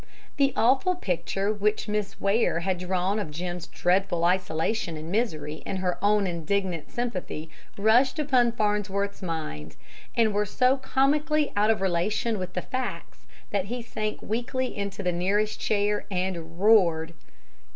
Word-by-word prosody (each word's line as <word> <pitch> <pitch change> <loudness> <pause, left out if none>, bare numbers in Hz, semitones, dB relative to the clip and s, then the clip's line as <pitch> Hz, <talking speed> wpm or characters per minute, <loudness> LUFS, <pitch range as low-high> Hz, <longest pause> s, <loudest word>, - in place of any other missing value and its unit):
The 275 -1 +4
awful 265 +10 +3
picture 195 - -1
which 210 +1 0
Miss 210 -1 -2
Ware 200 -4 +2
had 185 0 -1
drawn 185 +3 0
of 200 - -3
Jim's 175 +2 -5
dreadful 180 -1 +1
isolation 180 +1 0
and 155 +2 -7
misery 155 -9 -1
and 190 - -3
her 185 -1 -1
own 205 0 +4
indignant 175 -1 -2
sympathy 185 -9 -4 0.3
rushed 235 +7 +4
upon 255 -6 +3
Farnsworth's 205 -2 -1
mind, 155 - -5 0.4
and 225 -3 +4
were 205 0 +1
so 255 +6 +3
comically 295 +3 +1
out 210 +1 +3
of 220 -3 +2
relation 195 +4 0
with 185 0 -5
the 180 - -3
facts 255 -1 -5 0.2
that 200 -2 0
he 240 +3 -4
sank 215 -2 -4
weakly 245 +3 -2
into 200 0 -4
the 180 - +1
nearest 205 +5 0
chair 210 0 +1
and 180 -3 -3
roared. 170 -6 +4
200 Hz, 145 wpm, -26 LUFS, 180-225 Hz, 0.4 s, The